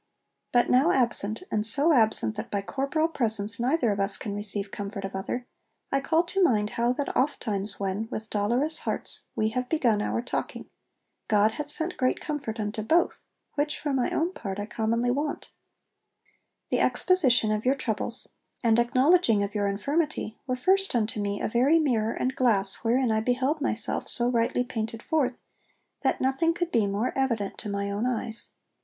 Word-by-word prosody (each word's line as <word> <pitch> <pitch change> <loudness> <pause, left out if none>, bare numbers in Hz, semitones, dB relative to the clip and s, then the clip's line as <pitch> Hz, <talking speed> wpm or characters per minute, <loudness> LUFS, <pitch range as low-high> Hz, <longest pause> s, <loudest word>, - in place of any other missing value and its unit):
But 240 -1 +3
now 270 +7 +4
absent, 235 - +1
and 210 - 0
so 280 +9 +4
absent 220 - +3
that - - -6
by 200 -1 -2
corporal 280 +7 -1
presence 225 -8 +3
neither 250 -1 +1
of 200 - -2
us 195 0 0
can 205 - -5
receive 205 -1 -2
comfort 200 -1 -5
of 195 - -6
other, 225 +6 -4 0.5
I 275 - +2
call 320 +4 +2
to 380 +2 0
mind 215 -9 +2
how 235 +1 +1
that 280 +2 -3
ofttimes 210 -7 -1
when, 200 +3 -2
with 220 -3 -6
dolorous 240 +10 +2
hearts, - - -3
we 220 - +1
have 250 +2 -3
begun 240 -10 +2
our 230 - -1
talking, - - -4 0.6
God 215 0 +3
hath 295 +5 -6
sent 320 +4 -1
great 255 0 +1
comfort 280 -8 -4
unto 210 +1 -3
both, 330 +11 +1 0.3
which 295 +1 -1
for 290 -2 -3
my 255 -2 +1
own 340 +4 -1
part 195 - -5
I 205 - -3
commonly 230 +2 0
want. 290 +3 -3 1.2
The - - +2
exposition 260 - +4
of 215 0 -1
your 260 +2 +2
troubles, 235 -1 -4 0.4
and 230 -1 +4
acknowledging 255 - +3
of 200 0 -4
your 205 -1 0
infirmity, 280 +4 -1
were 255 - 0
first 385 +6 +2
unto 215 -2 0
me 200 0 -2
a - - -1
very 255 +8 +3
mirror 230 -8 +1
and 260 +1 -2
glass 205 -6 +2
wherein 240 +1 +2
I 220 - +2
beheld 260 +6 0
myself 225 -6 -2
so 240 0 +1
rightly 235 +1 +1
painted 225 -2 -5
forth, 265 -6 0 0.6
that - - 0
nothing 270 +6 +1
could 350 -1 -2
be 220 -3 +2
more 205 +5 -1
evident 235 -7 -1
to 215 - -6
my 200 0 -2
own 210 +5 -1
eyes. 230 -2 -3
235 Hz, 180 wpm, -27 LUFS, 210-275 Hz, 1.2 s, now